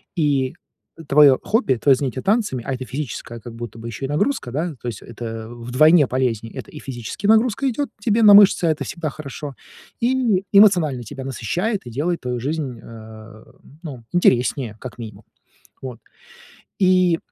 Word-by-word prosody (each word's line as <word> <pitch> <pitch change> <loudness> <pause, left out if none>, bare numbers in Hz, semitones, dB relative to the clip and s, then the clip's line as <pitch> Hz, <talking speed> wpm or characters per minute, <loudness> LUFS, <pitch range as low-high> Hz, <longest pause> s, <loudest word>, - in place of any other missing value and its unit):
и 145 -4 0 0.5
твоё 140 -2 +6
хобби, 215 - +1
твоё 135 +4 +4
занятие 130 -1 -4
танцами- 205 - 0
а 135 - -1
это 130 0 -5
физическая 125 -3 -6
как 115 +1 -10
будто 115 -1 -8
бы 115 +1 -8
ещё 115 +4 -5
и - - -3
нагрузка, 155 - -1
да, 160 +6 -2
то - - -6
есть 115 -4 -6
это 115 -1 -7
вдвойне 130 +7 +3
полезней. 115 -3 -2
Это - - -9
и 150 - -9
физически 130 - -6
нагрузка 225 +4 +3
идёт 280 +3 -3
тебе 220 +1 +2
на 205 -1 +9
мышцы, 200 -3 +7
а 165 - +3
это 155 - -3
всегда 165 -3 -4
хорошо, 140 -1 -8 0.4
и 235 -6 +1
эмоционально 175 - +4
тебя 135 +4 -8
насыщает, 180 - -2
и 120 - -8
делает 165 +8 -2
твою 125 -1 -3
жизнь, 135 -2 -4
э, 110 -1 -12 0.4
ну, 130 -8 -9
интереснее, 125 -7 +1
как 130 - -8
минимум. 110 -3 -10 0.6
Вот. 125 -3 -8 0.8
И 185 -3 +3
140 Hz, 165 wpm, -21 LUFS, 120-180 Hz, 0.8 s, на